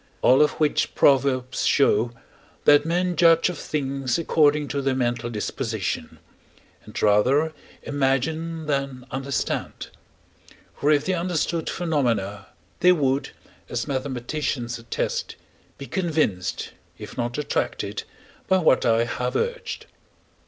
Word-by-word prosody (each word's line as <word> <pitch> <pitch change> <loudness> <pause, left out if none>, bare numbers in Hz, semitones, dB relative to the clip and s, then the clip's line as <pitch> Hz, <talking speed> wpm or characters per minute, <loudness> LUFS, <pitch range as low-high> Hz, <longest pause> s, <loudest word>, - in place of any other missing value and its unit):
All 130 +3 +6
of 150 - +4
which 150 -2 0
proverbs 130 -2 +2
show, 120 -4 +3 0.5
that 145 +1 +6
men 180 +1 0
judge 165 0 +5
of 175 - -5
things 135 -3 -2
according 150 -3 +3
to 140 - -1
their 135 -1 0
mental 120 -2 -1
disposition, 110 -2 -3 0.7
and - - -7
rather 130 +10 +3 0.3
imagine 155 +4 -1
than 135 -3 -2
understand: 135 +1 -3 0.9
for, 145 - 0
if 145 -1 +3
they 185 - +1
understood 170 -2 -1
phenomena, 115 - -1 0.3
they 180 - +6
would, 140 -4 0 0.4
as - - -3
mathematicians 130 -2 -3
attest, 115 0 -3 0.4
be 140 - -7
convinced, 155 - -1 0.3
if - - -9
not 120 0 -2
attracted, 150 - -2 0.5
by 190 - +4
what 160 -9 +3
I 115 0 +4
have 125 +1 -3
urged. 480 +1 -2
140 Hz, 115 wpm, -24 LUFS, 125-160 Hz, 0.9 s, All